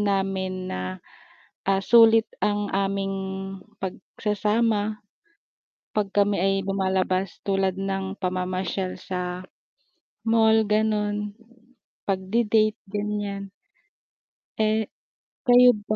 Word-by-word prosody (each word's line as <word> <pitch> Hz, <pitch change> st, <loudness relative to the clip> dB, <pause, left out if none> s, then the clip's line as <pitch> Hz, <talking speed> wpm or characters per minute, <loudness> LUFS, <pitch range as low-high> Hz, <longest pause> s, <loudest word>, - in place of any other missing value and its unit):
namin 190 Hz, -2 st, -1 dB
na, 90 Hz, -, -3 dB, 0.9 s
ah, 195 Hz, 0 st, +2 dB
sulit 225 Hz, -1 st, +7 dB
ang 205 Hz, -1 st, 0 dB
aming 195 Hz, 0 st, 0 dB, 0.7 s
pagsasama 210 Hz, +2 st, -1 dB, 0.9 s
'pag 210 Hz, -2 st, +1 dB
kami 205 Hz, 0 st, +3 dB
ay 195 Hz, 0 st, +3 dB
lumalabas 190 Hz, -1 st, 0 dB
tulad 195 Hz, -1 st, +1 dB
ng 195 Hz, 0 st, -3 dB
pamamasyal 185 Hz, 0 st, -2 dB
sa 180 Hz, 0 st, -4 dB, 0.8 s
mall 220 Hz, -1 st, +4 dB
ganun. 210 Hz, -1 st, 0 dB, 0.7 s
Pagdi-date 215 Hz, +3 st, +2 dB
ganyan. 205 Hz, -1 st, -3 dB, 1.1 s
Eh, 215 Hz, 0 st, +2 dB, 0.6 s
kayo 245 Hz, 0 st, +8 dB, 0.2 s
ba? 215 Hz, -, +1 dB
200 Hz, 85 wpm, -25 LUFS, 190-215 Hz, 1.1 s, kayo